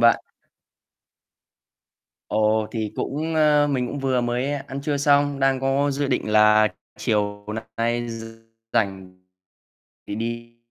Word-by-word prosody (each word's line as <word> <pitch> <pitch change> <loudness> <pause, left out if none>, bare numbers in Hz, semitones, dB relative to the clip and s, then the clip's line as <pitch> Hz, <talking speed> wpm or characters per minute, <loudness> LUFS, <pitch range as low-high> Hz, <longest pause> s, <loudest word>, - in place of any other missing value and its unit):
bạn. 115 0 +6 2.1
Ồ, 110 0 +2
thì 110 -3 -3
cũng 160 +4 -2
ơ, 150 -1 +4
mình 130 -3 0
cũng 145 - -5
vừa 130 -2 +1
mới 120 +3 -1
ăn 140 -1 -5
trưa 145 0 -1
xong, 145 0 +3
đang 135 -1 +2
có 135 +2 +1
dự 140 +1 -1
định 110 - -1
là 105 0 +6 0.3
chiều 105 -1 -1 0.3
nay 120 +1 0
r 115 0 -6 0.5
rảnh. 95 -4 -1 0.9
Thì 100 - -4
đi 115 +1 -5
120 Hz, 130 wpm, -23 LUFS, 110-140 Hz, 2.1 s, bạn